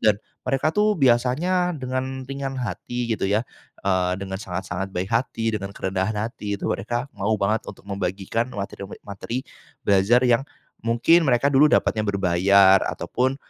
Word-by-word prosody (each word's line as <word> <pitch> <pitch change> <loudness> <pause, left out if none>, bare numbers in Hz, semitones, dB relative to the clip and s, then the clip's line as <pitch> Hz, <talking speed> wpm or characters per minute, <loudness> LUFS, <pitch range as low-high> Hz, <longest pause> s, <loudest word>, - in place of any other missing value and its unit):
dan 105 -2 +5 0.3
mereka 135 +3 +1
tuh 210 0 +4
biasanya 150 +8 +2
dengan 130 0 -3
ringan 135 0 -4
hati 120 -1 -4
gitu 105 - -2
ya. 105 +4 +1 0.4
Eee, 95 -2 +1
dengan 95 -1 -4
sangat-sangat 95 -1 -5
baik 90 +2 -2
hati, 115 -1 0
dengan 100 0 -6
kerendahan 95 +2 -2
hati 105 -4 -5
itu - - -4
mereka 120 +6 -2
mau 100 +3 0
banget 105 +3 +1
untuk - - -10
membagikan 100 +3 -2
materi 100 0 -5
me 95 - -9
materi 105 +5 -4 0.4
belajar 100 +5 +4
yang 120 +3 +3 0.4
mungkin 120 +9 +4
mereka 125 +3 +3
dulu 140 +1 +5
dapatnya 110 -6 +2
berbayar 95 0 +4
ataupun, 130 +2 -1
110 Hz, 150 wpm, -23 LUFS, 95-130 Hz, 0.4 s, dan